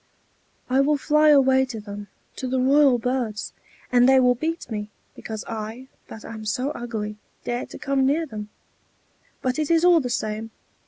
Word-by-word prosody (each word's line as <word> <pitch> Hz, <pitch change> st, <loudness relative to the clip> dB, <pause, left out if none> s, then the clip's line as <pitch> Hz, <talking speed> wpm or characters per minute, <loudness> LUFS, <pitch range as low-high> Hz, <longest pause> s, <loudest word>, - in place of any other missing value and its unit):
"I 260 Hz, +1 st, +2 dB
will 295 Hz, +2 st, +2 dB
fly 300 Hz, +2 st, +3 dB
away 265 Hz, -2 st, +5 dB
to 240 Hz, -4 st, -7 dB
them, 205 Hz, 0 st, -8 dB, 0.3 s
to 260 Hz, -, -4 dB
the 260 Hz, +1 st, 0 dB
royal 270 Hz, 0 st, +5 dB
birds! 240 Hz, -3 st, -2 dB, 0.4 s
and 245 Hz, +1 st, +5 dB
they 265 Hz, 0 st, +6 dB
will 250 Hz, -1 st, +5 dB
beat 320 Hz, +7 st, -3 dB
me, 210 Hz, -1 st, -4 dB, 0.2 s
because 220 Hz, -1 st, -7 dB
I, 225 Hz, +3 st, -6 dB, 0.2 s
that 220 Hz, -, -10 dB
am 220 Hz, -1 st, -8 dB
so 250 Hz, +6 st, -1 dB
ugly, 215 Hz, -4 st, -5 dB, 0.3 s
dare 240 Hz, 0 st, -3 dB
to -, -, -10 dB
come 275 Hz, -2 st, 0 dB
near 315 Hz, +4 st, +1 dB
them. 210 Hz, -7 st, -7 dB, 0.9 s
But 255 Hz, +2 st, 0 dB
it 305 Hz, -, -1 dB
is 335 Hz, +1 st, +4 dB
all 350 Hz, -2 st, +6 dB
the 255 Hz, -4 st, -3 dB
same. 220 Hz, -1 st, -3 dB
250 Hz, 175 wpm, -24 LUFS, 220-275 Hz, 0.9 s, they